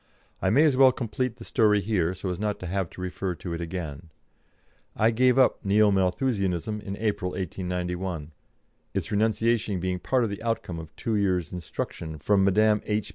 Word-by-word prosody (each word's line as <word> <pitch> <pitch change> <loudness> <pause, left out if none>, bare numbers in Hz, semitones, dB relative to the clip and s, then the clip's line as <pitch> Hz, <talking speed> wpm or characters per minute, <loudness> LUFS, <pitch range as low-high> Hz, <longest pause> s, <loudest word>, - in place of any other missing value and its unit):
I - - +2
may 140 +7 +5
as 150 -4 +4
well 130 0 +7
complete 120 0 -3
the - - -11
story 105 -4 +3
here, 95 -4 0
so 95 - -4
as 90 - -4
not 105 -1 -1
to - - -5
have 95 0 -2
to - - -10
refer 90 0 -3
to 85 0 -6
it 85 - -4
again. 85 -2 -5 0.9
I 110 +2 +3
gave 125 +2 +3
up 130 -4 +3
Neo 105 +1 +4
Malthusianism 100 0 0
in 100 -1 -6
April, 105 -4 -1
1891, 90 -2 -3 0.6
its - - -2
renunciation 110 -1 +1
being 90 0 -2
part 130 +6 +1
of 110 - -1
the 100 - -6
outcome 115 -7 -2
of 80 -1 -10
two 115 - -2
years' 90 -6 0
instruction 80 -2 -5
from 100 +6 +2
Mdme. 105 +2 +4
H. 105 0 -1
100 Hz, 185 wpm, -26 LUFS, 90-110 Hz, 0.9 s, well